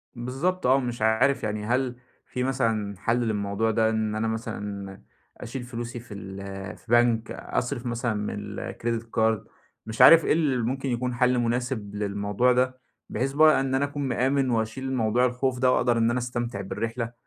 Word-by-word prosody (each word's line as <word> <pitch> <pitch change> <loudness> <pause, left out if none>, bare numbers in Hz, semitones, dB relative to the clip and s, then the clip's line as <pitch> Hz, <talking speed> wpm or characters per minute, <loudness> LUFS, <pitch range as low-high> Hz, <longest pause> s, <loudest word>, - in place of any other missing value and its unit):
بالضبط، 135 +10 -2
آه. 130 +2 +5
مش 120 -3 -4
عارف 110 +5 +3
يعني 105 -1 -2
هل 125 +2 0 0.3
في 125 - -3
مثلًا 115 -6 0
حل 120 +2 +1
للموضوع 110 -1 0
ده 110 0 +2
إن 110 -1 -1
أنا 110 +1 0
مثلًا 105 -3 -5 0.4
أشيل 125 +2 -6
فلوسي 120 0 -6
في 120 -2 -11
ال 95 -1 -7
في - - -23
بنك؟ 120 -1 +3
أصرف 125 0 -3
مثلًا 120 -1 -1
من 105 0 -4
الكريديت 115 -1 -3
كارد؟ 110 -2 +1 0.4
مش 110 0 -2
عارف 165 -1 +9
إيه - - +3
اللي 150 -5 +1
ممكن 130 +3 -2
يكون 125 +1 -1
حل 125 +1 +3
مناسب 120 -3 -2
للموضوع 100 +4 +1
ده 130 +1 +1 0.3
بحيث 135 +5 -2
إن 145 -4 +4
أنا 135 +2 +2
أكون 145 0 -4
مآمن 130 +2 +1
وأشيل 115 +2 -1
الموضوع 125 -2 +1
الخوف 125 0 -1
ده، 130 0 +4
وأقدر 120 -1 +2
إن 115 0 +3
أنا 125 - 0
أستمتع 120 -3 -3
بالرحلة. 115 +4 -4
120 Hz, 170 wpm, -26 LUFS, 110-130 Hz, 0.4 s, عارف